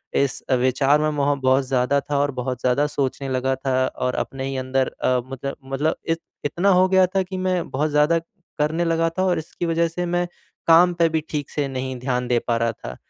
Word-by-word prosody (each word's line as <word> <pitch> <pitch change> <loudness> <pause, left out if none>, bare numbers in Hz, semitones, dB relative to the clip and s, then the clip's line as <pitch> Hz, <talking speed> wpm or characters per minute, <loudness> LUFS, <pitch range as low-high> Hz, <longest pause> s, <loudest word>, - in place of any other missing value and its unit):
इस 140 -1 +1
अ, 130 - +4
विचार 135 +3 +3
में 155 - +2
वहाँ 145 -1 +1
बहुत 130 +1 +3
ज़्यादा 130 +2 +2
था 145 0 -2
और 145 0 +1
बहुत 125 -1 -4
ज़्यादा 130 +4 +2
सोचने 135 -1 -2
लगा 130 +1 0
था 135 0 -2
और 125 0 -2
अपने 135 0 -3
ही 135 0 -3
अंदर 130 0 0 0.2
अ, 125 0 +3
मतलब 135 +1 -5
मतलब 135 +4 -1
इत 165 0 +1 0.3
इतना 175 +7 +1
हो 185 0 +5
गया 190 0 +5
था 190 - +3
कि 185 +1 -6
मैं 185 -2 -1
बहुत 150 +4 0
ज़्यादा 150 +3 +3 0.4
करने 160 +3 +1
लगा 165 0 +1
था 185 - +2
और 180 -3 +1
इसकी 160 +2 -5
वज़ह 165 0 +2
से 175 +2 -3
मैं 175 0 0 0.4
काम 175 +2 +6
पर 170 -1 +3
भी 160 0 0
ठीक 145 -2 -3
से 145 -2 -2
नहीं 130 0 -4
ध्यान 125 -1 -1
दे 120 -1 +2
पा 120 -1 +2
रहा 115 0 +1
था। - - -9
145 Hz, 225 wpm, -22 LUFS, 130-165 Hz, 0.4 s, काम